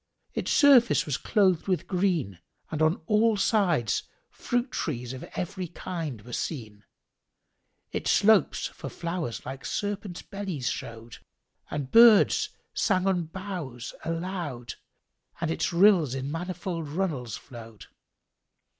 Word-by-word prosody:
Its - - -3
surface 270 -5 +6
was 145 - -1
clothed 190 - +2
with 185 -2 0
green 175 - 0 0.3
and 155 -1 -2
on 155 +2 +4
all 215 +2 +3
sides 180 - +2 0.3
fruit 245 +1 -2
trees 125 -5 -3
of 130 - -7
every 180 0 -3
kind 160 - -5
were 120 - -10
seen: 110 -10 -4 1.1
its - - -2
slopes 215 -1 +4
for - - -6
flowers 170 -7 -4
like 135 +1 -7
serpents' 205 -3 -4
bellies 190 - -4
showed, 115 0 -8 0.5
and 140 -3 -4
birds 230 -2 +7 0.2
sang 185 -3 +1
on 180 -3 +1
boughs 165 -9 -6
aloud 165 - -4 0.7
and 165 -1 -1
its 160 +1 -1
rills 170 -7 +5
in 135 +1 -4
manifold 175 -1 -4
runnels 150 - -2
flowed. 115 -4 -12
170 Hz, 120 wpm, -27 LUFS, 130-195 Hz, 1.1 s, birds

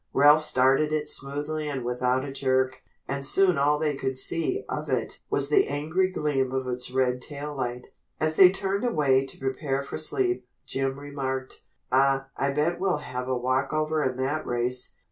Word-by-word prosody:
Ralph 145 +3 +6
started 135 +2 +3
it 150 -1 -1
smoothly 150 +3 -3
and 135 -4 -4
without 125 +2 0
a 140 - -6
jerk, 130 -1 0 0.3
and 140 0 -3
soon 180 +2 +3
all 145 +1 +3
they 150 -1 0
could 130 -1 -3
see 370 - -1
of - - -4
it - - -2
was - - +2
the 390 -2 +4
angry 160 +6 0
gleam 145 -7 -1
of 130 0 -2
its 125 0 -2
red 125 -1 0
tail 145 +1 -6
light. 125 -2 -3 0.3
As 155 0 +1
they 185 +1 +9
turned 195 +2 -2
away 145 - +3
to - - -4
prepare 135 +1 -2
for 140 - -4
sleep, 125 -5 0 0.2
Jim 135 0 -2
remarked: 135 -2 -4 0.3
"Aw, 135 +1 +3
I 140 +1 0
bet 150 +5 0
we'll 190 -1 +1
have 125 0 -5
a 130 -1 0
walkover 140 +5 0
in 130 -1 -1
that 140 +4 -1
race." 125 +1 -1
140 Hz, 180 wpm, -26 LUFS, 130-155 Hz, 0.3 s, they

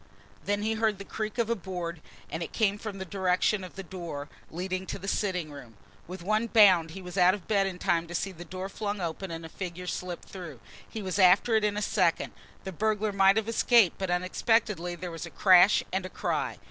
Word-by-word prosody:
Then 205 0 0
he 220 +1 +1
heard 220 -2 +1
the 200 - -9
creak 215 +3 -5
of 235 -2 +1
a 235 - +1
board 175 -4 -5 0.3
and 160 - -4
it 165 - -4
came 205 -2 +1
from 210 -2 -6
the 190 - -5
direction 190 +2 +1
of 185 - -10
the 195 - -6
door 170 -6 -7 0.2
leading 185 +2 -4
to - - -4
the 195 0 -8
sitting 180 -6 -1
room. 125 -7 -12 0.3
With 180 0 -8
one 215 +4 +1
bound 190 -8 +6
he 190 - -8
was 180 +1 -4
out 180 +2 +6
of 195 - -12
bed 200 -2 +2
in 185 -2 -5
time 170 -1 0
to 175 - -6
see 195 - -2
the 175 -1 -10
door 185 +2 -6
flung 205 0 -4
open 175 +2 -4
and 165 0 -6
a - - -8
figure 180 0 -6
slip 180 -1 -5
through. 170 -9 -9 0.3
He 220 - -6
was 190 +1 -2
after 190 +5 +5
it 220 -1 +3
in 210 -1 0
a 210 - -1
second. 185 -7 +1 0.3
The 190 - -5
burglar 215 +3 0
might 195 +1 +4
have 220 -1 0
escaped, 230 -4 +4
but 190 -1 -2
unexpectedly 180 0 0
there 180 0 -6
was 165 +1 -6
a - - -9
crash 185 +2 +6
and 190 0 0
a 185 - -6
cry. - - -2
190 Hz, 230 wpm, -28 LUFS, 175-205 Hz, 0.3 s, bound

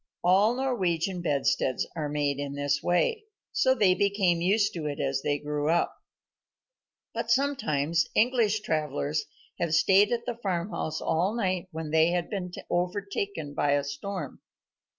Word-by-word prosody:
All 195 +6 +4
Norwegian 190 -9 -1
bedsteads 140 -4 +1
are 155 -3 -2
made 145 -1 -1
in 140 0 -4
this 145 0 0
way, 435 - +1 0.3
so 260 0 +3
they 200 -6 +4
became 195 -3 +1
used 200 +4 +2
to 160 -4 -4
it 145 - -4
as 135 -1 0
they 145 +1 0
grew 150 +1 -2
up. 170 +1 +1 1.2
But - - -3
sometimes 210 - +1
English 225 -3 +3
travellers 150 -4 -1 0.3
had 165 -2 +1
stayed 195 +5 +5
at 235 -1 -1
the 240 -1 -4
farmhouse 175 -4 -2
all 180 +7 0
night 185 -5 -1
when 160 -3 -6
they 160 0 +5
had 175 -1 -1
been 185 -4 -3 0.2
overtaken 180 -3 -2
by 145 0 +1
a 145 0 +2
storm. 180 +8 -6
175 Hz, 150 wpm, -28 LUFS, 150-205 Hz, 1.2 s, stayed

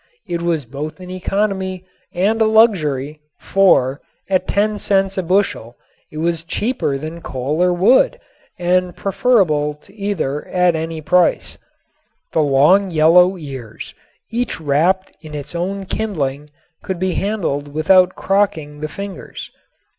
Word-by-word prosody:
It 170 -1 -3
was 165 -5 -1
both 145 +8 -6
an 180 0 -9
economy 190 0 -2 0.3
and 205 +6 0
a - - +5
luxury, 155 - +2 0.2
for 145 -9 +3 0.3
at 185 -1 +1
ten 210 +1 0
cents 195 -1 +1
a 190 - 0
bushel 180 - 0 0.4
it 155 - -9
was 165 0 -1
cheaper 190 - -1
than 160 +4 -7
coal 140 +5 -3
or 180 0 +4
wood 260 - +3 0.4
and 180 0 +1
preferable 180 -9 +1
to 150 +6 -21
either 195 -9 -3
at 180 -2 +2
any 160 0 -4
price. 180 +3 +1 0.7
The 160 - +2
long 150 +8 +4
yellow 180 +3 +5
ears, 135 -8 -8 0.4
each 240 -3 -2
wrapped 165 +6 +1
in 155 -2 -9
its 145 +1 -6
own 190 +3 -3
kindling, 150 -9 -3 0.3
could 190 - -4
be 185 +1 -1
handled 165 -9 -2
without 180 +4 +4
crocking 175 -7 0
the 155 - -3
fingers. 200 +4 -8
175 Hz, 135 wpm, -18 LUFS, 150-195 Hz, 0.7 s, a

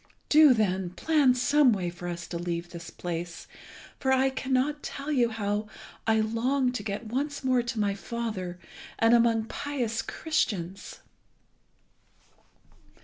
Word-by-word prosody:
Do, 300 -4 +7
then, 190 -4 0
plan 280 - +3
some 280 0 +4
way 180 -4 -2
for 175 +1 -8
us 170 -1 -4
to 170 - -4
leave 170 0 -4
this 170 -1 -8
place, 170 -1 -5 0.5
for 265 - +1
I 265 0 +3
cannot 265 +3 0
tell 280 +2 -5
you 245 -5 +3
how 210 -1 -2 0.4
I 220 0 +4
long 250 +4 +1
to 245 - -4
get 205 +2 -4
once 280 +6 -3
more 255 -1 +3
to 235 -1 -4
my 205 -1 +1
father, 200 -3 -4 0.4
and 225 +1 +4
among 230 -1 +4
pious 240 -4 -3
Christians." 200 - -3
225 Hz, 140 wpm, -28 LUFS, 190-265 Hz, 0.5 s, Do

